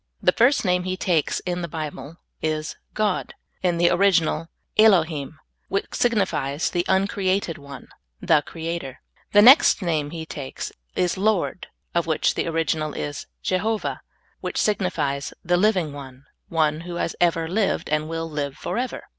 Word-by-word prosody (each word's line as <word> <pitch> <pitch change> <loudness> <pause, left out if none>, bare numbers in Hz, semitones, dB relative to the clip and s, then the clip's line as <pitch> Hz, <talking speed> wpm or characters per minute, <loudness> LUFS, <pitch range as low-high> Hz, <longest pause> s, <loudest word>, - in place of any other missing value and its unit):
The - - +4
first 245 +1 +3
name 180 -1 +2
He 185 0 -2
takes 175 -6 +1
in 180 -1 -3
the 170 - -3
Bible 155 -1 -6 0.2
is 155 0 -2 0.2
God, 210 -3 -1 0.3
in 175 -2 +1
the 175 0 +4
original 175 -4 +2 0.3
Elohim, 160 -9 +3 0.3
which 195 - -2
sig 240 -1 +2
nifies 150 -7 0
the 175 - 0
uncreated 190 -3 +1
One 140 -1 -10 0.2
— - - -51
the 150 - +6
Creator. 165 -4 -5 0.3
The 205 0 +8
next 260 - +7
name 155 -4 0
He 160 0 -6
takes 140 -4 -6 0.2
is 180 +1 0
Lord, 200 -3 0 0.3
of 170 -1 +1
which 160 - +2
the - - -2
original 160 -2 -1
is 145 -1 -5 0.2
Jehovah, 215 +4 -1 0.4
which - - -4
signifies 155 -9 0
the 175 +1 +3
living 180 -5 +2
One, 135 -1 -10 0.2
One 155 -1 +1
who 175 0 -7
has 170 - -2
ever 165 -2 +2
lived 200 +4 0
ind 150 +1 -1
will 165 0 -3
live 145 -3 -4
forever. 250 +1 -3
170 Hz, 155 wpm, -23 LUFS, 155-190 Hz, 0.4 s, The